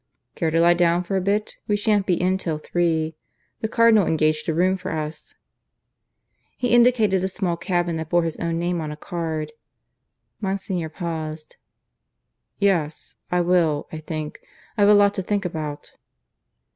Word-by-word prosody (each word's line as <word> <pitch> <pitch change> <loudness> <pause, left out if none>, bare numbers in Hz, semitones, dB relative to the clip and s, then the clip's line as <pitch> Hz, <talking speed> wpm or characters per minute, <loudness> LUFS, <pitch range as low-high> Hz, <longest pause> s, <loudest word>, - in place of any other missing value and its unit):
"Care 165 - -1
to 165 +1 +1
lie 170 +1 +6
down 175 0 +2
for 195 +2 -3
a 190 - +1
bit? 205 +3 -1
We 210 - +2
shan't 205 -1 +1
be 180 -3 +2
in 185 +1 +1
till 160 -5 -2
three. 160 -1 -1 0.4
The 220 - -1
Cardinal 220 -3 +4
engaged 155 0 +1
a - - +1
room 185 +3 +3
for 185 0 -6
us." 155 -1 -5 1.2
He 245 -1 0
indicated 230 -6 +4
a - - +1
small 185 -2 -2
cabin 175 -1 -1
that 160 -1 -5
bore 175 0 +3
his 165 -2 -3
own 165 -1 -2
name 175 0 -1
on 155 -1 -4
a 150 - -7
card. 160 -2 -4 0.9
Monsignor 190 -4 -2
paused. 155 -2 -5 1.0
"Yes, 170 -7 0 0.2
I 180 0 +2
will, 170 -4 +2
I 160 - -6
think. 155 -1 -5 0.4
I've 205 -2 +4
a 210 - +8
lot 205 0 +5
to 195 - -2
think 200 +1 -1
about." 155 -4 -5
175 Hz, 165 wpm, -23 LUFS, 160-195 Hz, 1.2 s, a